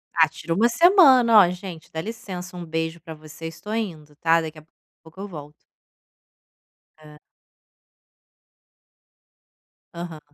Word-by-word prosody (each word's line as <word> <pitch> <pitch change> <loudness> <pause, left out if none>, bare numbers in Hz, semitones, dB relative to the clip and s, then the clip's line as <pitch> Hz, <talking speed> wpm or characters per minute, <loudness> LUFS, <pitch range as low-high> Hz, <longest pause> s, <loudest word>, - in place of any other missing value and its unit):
Ah, 160 -1 +5
tira 160 +1 -5
uma 220 +7 +3
semana: 260 - +6
"Ó, 185 -4 +6
gente, 180 -2 -9
dá 160 - -5
licença, 190 -4 -8
um 175 -1 -7
beijo 160 +1 -3
pra 160 0 -9
vocês, 155 +1 -10
tô 210 - -7
indo, 160 -10 -5
tá. 165 +1 +3
Daqui 160 -1 -7
a 155 - -20 0.4
pouco 160 +3 -16
eu 200 - -6
volto". 150 -5 -10 1.5
Hã. 150 -1 -16 2.8
Aham. 160 -4 -9
165 Hz, 130 wpm, -23 LUFS, 160-205 Hz, 2.8 s, semana